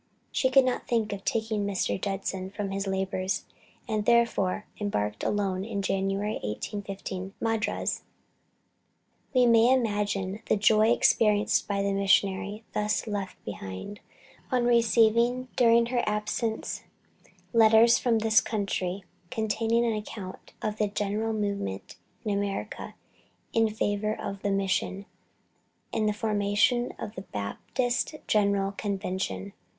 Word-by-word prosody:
She 260 - +2
could 265 0 +6
not 255 - -1
think 225 -3 0
of 195 -1 -7
taking 220 -2 -1
Mr. 195 -2 -1
Judson 195 -1 -3
from 200 0 -4
his 195 0 -2
labors, 190 0 -1 0.4
and 215 -2 0
therefore 225 -4 +2
embarked 105 - -2
alone 195 -2 0
in 200 -2 -3
January, 195 +2 -1
1815, 195 - -5
for - - -9
Madras. 225 -1 -1 1.3
We 255 -2 +4
may 230 +1 +6
imagine 205 -5 0
the - - +3
joy 215 +1 +4
experienced 210 -3 +3
by 200 -1 0
the 200 0 0
missionary, 200 +2 +1
thus 210 +1 0
left 205 -3 -5
behind, 100 - -7 0.5
on 250 -2 +2
receiving 235 +2 +3
during 235 -1 +5
her 240 - +3
absence 210 +2 -2 0.7
letters 225 +1 +6
from 235 -2 +2
this 220 0 +4
country, 195 -3 -2 0.3
containing 225 +2 +1
an 230 - +1
account 210 -3 -7
of 215 0 -2
the 210 - +2
general 210 +2 -1
movement 200 - -3 0.3
in 210 - 0
America 200 0 -3 0.6
in 225 -1 +3
favor 215 0 -1
of 195 0 -5
the 205 - 0
Mission, 195 0 0 0.9
and 215 -1 +1
the - - 0
formation 210 +3 +1
of 210 -1 -6
the 185 - -6
Baptist 240 - -2
General 200 -2 +2
Convention. 190 - -3
205 Hz, 125 wpm, -28 LUFS, 195-225 Hz, 1.3 s, could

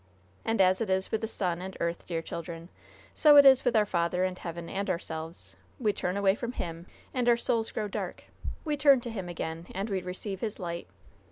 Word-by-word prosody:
And 225 -1 0
as 185 +1 +4
it 220 - -1
is 190 0 0
with 220 - 0
the 220 - -1
sun 180 -5 -1
and 190 0 -7
earth, 170 0 -2
dear 165 -2 -2
children, 170 0 -7 0.4
so 300 -1 +6
it 285 -1 +10
is 265 -1 +8
with 245 -2 +2
our 215 -1 +5
Father 180 -1 0
in 185 -1 -2
heaven 170 -1 -6
and 200 +1 -3
ourselves. 160 - -5 0.2
We 215 -5 +2
turn 180 0 -2
away 195 -1 +4
from 235 +3 -4
Him, 170 -3 -5 0.3
and 245 -2 +2
our 235 - +5
souls 230 -1 +1
grow 215 - -3
dark; 200 - -5 0.4
we 300 -1 0
turn 280 -2 +6
to 235 - -5
Him 190 -5 -5
again, 165 0 -5
and 200 +3 -2
we 190 -1 0
receive 185 +2 -5
His 220 0 -3
light. 170 -2 -4
190 Hz, 215 wpm, -29 LUFS, 170-225 Hz, 0.4 s, it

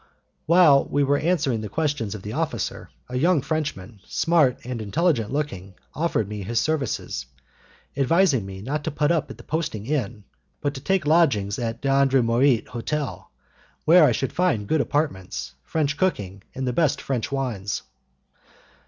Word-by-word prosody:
While 160 -5 +6
we 145 - +1
were 140 +1 +2
answering 145 -9 +1
the 105 - -5
questions 145 -9 -1
of 100 - -9
the 105 - -5
officer, - - -3 0.2
a 125 0 -3
young 165 -1 +3
Frenchman, 120 - -3
smart 155 -7 +2
and 125 -2 -5
intelligent 120 - +1
looking, 100 -11 -4 0.2
offered 155 -10 0
me 105 0 -5
his 115 +4 -1
services, 135 - -2 0.7
and 140 - -1
advised 165 - +3
me 95 0 -8
not 145 +5 -2
to - - 0
put 150 +1 +1
up 165 -3 0
at - - -9
the - - -13
posting 150 -10 -3
inn, 120 -6 -2 0.4
but 145 - -1
to 130 - -8
take 190 +2 +1
lodgings 135 -11 +3
at 115 -1 -3
D'Andremorit's 135 -2 +3
hotel, 120 - -4 0.6
where 170 +2 +7
I 145 - +5
should 130 +4 -2
find 175 - +1
good 155 +3 +2
apartments, 145 - -2
French 155 -2 -1
cooking, 100 - -1
and 130 0 -3
the 125 - 0
best 155 +1 +2
French 130 -3 -3
wines. 120 -8 -2
135 Hz, 160 wpm, -24 LUFS, 110-155 Hz, 0.7 s, where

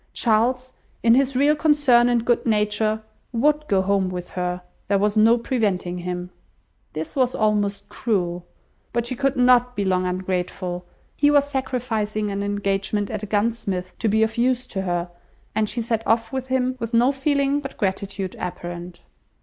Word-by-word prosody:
Charles, 250 +3 +1 0.3
in 230 - +6
his 265 +1 +2
real 285 +3 +4
concern 290 -6 +4
and 235 -1 +1
good 240 0 +2
nature, 215 0 +1 0.3
would 300 +5 +1
go 190 -2 +2
home 195 -1 +1
with 180 -1 -6
her; 180 0 -3 0.2
there 200 - +3
was 205 +1 +1
no 225 +2 +5
preventing 200 -7 -1
him. 180 0 -5 0.6
This 155 +1 -5
was 255 -2 +1
almost 205 -2 0
cruel. 180 -8 -2 0.5
But 235 0 0
she 255 - -3
could 275 +2 0
not 250 0 +4
be 200 - -1
long 185 -1 +1
ungrateful; 180 -1 -3 0.3
he 290 - +3
was 285 -1 +4
sacrificing 225 -6 -2
an 200 0 -2
engagement 205 0 -1
at 215 -2 -3
a 210 - -5
gunsmith's, 205 -3 -1
to 225 - 0
be 220 +1 +3
of 220 +1 -1
use 250 +1 +2
to 190 - -1
her; 175 -1 -2 0.4
and 215 -1 0
she 235 - -2
set 225 -1 -1
off 225 +3 +1
with 260 -1 -3
him, 255 0 0
with 230 0 -2
no 245 +3 +5
feeling 280 0 +1
but 275 -1 -8
gratitude 195 -1 -3
apparent. 175 0 -6
215 Hz, 170 wpm, -23 LUFS, 190-250 Hz, 0.6 s, in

